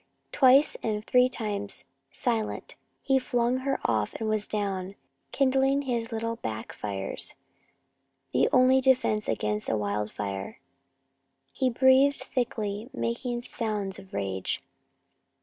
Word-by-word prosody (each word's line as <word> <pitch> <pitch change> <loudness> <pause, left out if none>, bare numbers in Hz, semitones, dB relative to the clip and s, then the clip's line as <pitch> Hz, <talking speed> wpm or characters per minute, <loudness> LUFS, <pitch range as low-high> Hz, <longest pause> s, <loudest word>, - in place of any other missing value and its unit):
Twice 270 +2 +5
and 215 -1 -2
three 250 0 +4
times, 205 -4 -4 0.3
silent, 230 -4 -2 0.3
he 270 -1 +3
flung 245 -1 +1
her 270 +1 -1
off 110 -3 0
and 220 - -3
was 215 -1 0
down, 195 -2 -3 0.4
kindling 270 +1 +2
his 235 -3 -2
little 230 0 -2
back 110 - -5
fires 100 -2 -4 1.0
the 130 +2 +3
only 260 +1 +5
defense 255 -5 +2
against 105 -1 -1
a 110 - +1
wildfire. 100 -1 -3 0.9
He 260 - +1
breathed 260 +3 +5
thickly, 220 -3 -2
making 240 +1 -2
sounds 210 -5 -3
of 190 -1 -15
rage. 95 -2 -2
225 Hz, 115 wpm, -28 LUFS, 185-255 Hz, 1.0 s, Twice